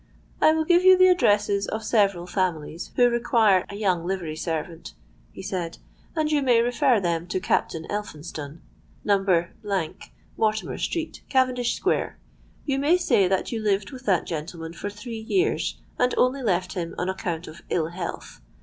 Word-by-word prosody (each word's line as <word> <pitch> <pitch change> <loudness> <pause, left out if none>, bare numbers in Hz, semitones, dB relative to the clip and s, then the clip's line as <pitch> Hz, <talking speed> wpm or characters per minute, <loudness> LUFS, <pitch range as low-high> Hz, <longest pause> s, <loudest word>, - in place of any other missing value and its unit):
'I 310 - +6
will 320 0 +1
give 350 +1 +5
you 375 0 +8
the 370 0 +7
addresses 205 - +2
of 220 0 -4
several 200 -5 +2
families 175 -3 -2
who 245 -1 +5
require 230 -5 +3
a 200 - -7
young 190 -5 0
livery 175 -4 -3
servant,' 165 0 -5 0.4
he - - -10
said; 175 -3 -4 0.4
'and 310 -1 0
you 295 -1 +2
may 245 -4 +4
refer 245 +1 +3
them 170 -2 -1
to 185 - -1
Captain 165 -2 -1
Elphinstone, 155 -6 -6 0.4
No.—, 195 -4 +2 0.9
Mortimer 215 0 0
Street, 330 -2 -3
Cavendish 255 -2 +2
Square. - - -1 0.5
You 275 -2 0
may 305 +6 +4
say 235 - +3
that 190 +6 0
you 225 -2 -2
lived 200 -1 0
with 255 -3 -11
that 185 -4 +2
gentleman 165 +1 -5
for 200 +4 -5
three 215 +3 -7
years, 370 - 0 0.2
and 250 0 +2
only 260 +2 +2
left 185 -5 0
him 170 -3 -4
on 180 - -2
account 175 -3 -3
of 155 +2 -11
ill 160 -2 0
health. 175 - -7
200 Hz, 165 wpm, -25 LUFS, 175-245 Hz, 0.9 s, you